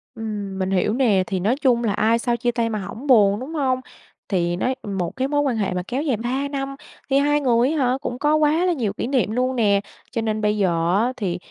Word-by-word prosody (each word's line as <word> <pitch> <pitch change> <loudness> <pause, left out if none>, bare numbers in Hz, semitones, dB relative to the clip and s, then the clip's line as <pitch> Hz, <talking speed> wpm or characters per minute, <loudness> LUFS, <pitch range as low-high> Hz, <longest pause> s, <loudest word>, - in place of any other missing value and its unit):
Ừm, 205 -3 -5
mình 190 0 -1
hiểu 195 +3 +1
nè. 220 -8 +3
Thì 190 -2 -2
nói 220 +8 +1
chung 240 -4 +3
là 210 -3 +1
ai 220 +3 +2
sau 240 -1 0
chia 240 0 0
tay 230 -1 -1
mà 215 -2 -2
hổng 220 +9 -7
buồn, 205 -4 +5
đúng 280 +6 -7
hông? 260 -4 0 0.5
Thì 175 -3 0
nói 255 +8 -1
một 195 -5 -3
cái 265 +1 -1
mối 290 0 +1
quan 260 -5 0
hệ 195 -3 -1
mà 180 0 -2
kéo 260 +4 -2
dài 270 -8 0
3 260 +5 -2
năm 275 -1 -4 0.3
thì 270 - +3
hai 295 +1 +2
người 245 0 +3
á 320 - -1
hả, 255 -1 +1
cũng 250 -1 -4
có 300 +1 +3
quá 310 +3 +3
là 360 - +2
nhiều 225 -9 -2
kỷ - - -3
niệm 255 -5 +1
luôn 255 +2 0
nè. 200 -4 +3 0.3
Cho 230 -2 -1
nên 215 -1 -1
bây 210 0 +1
giờ 170 -2 +1
á 255 - -1
thì 180 -6 -2
235 Hz, 255 wpm, -22 LUFS, 205-265 Hz, 0.5 s, buồn